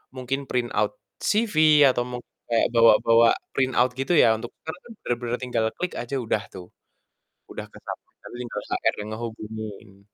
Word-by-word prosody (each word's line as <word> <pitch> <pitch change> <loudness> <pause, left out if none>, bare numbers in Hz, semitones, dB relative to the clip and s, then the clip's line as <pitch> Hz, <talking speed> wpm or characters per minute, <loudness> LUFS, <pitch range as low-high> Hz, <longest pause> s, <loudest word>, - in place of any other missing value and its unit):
mungkin 130 +1 -2
print 120 -1 0
out - - +1 0.4
CV, 215 -2 0 0.3
atau 120 -1 +1
mungkin 125 -1 -8 0.2
kayak 115 -1 +3
bawa-bawa 115 0 +6 0.3
print 130 -1 +1
out 125 0 +4
gitu 135 +6 0
ya, 115 - +6
untuk 120 +2 -8
sekarang 160 +3 -7
kan 235 - -11
benar-benar 120 0 -2
tinggal 125 -3 -1
klik 180 - -3
aja 120 +3 -4
udah 110 -3 -1
tuh. 90 -2 -9 0.8
Udah - - -6
ke - - -14
submit - - -8
tinggal 120 0 -6
HR - - +1
yang 105 - -7
ngehubungin. 110 -3 -8
120 Hz, 165 wpm, -25 LUFS, 110-130 Hz, 0.8 s, bawa-bawa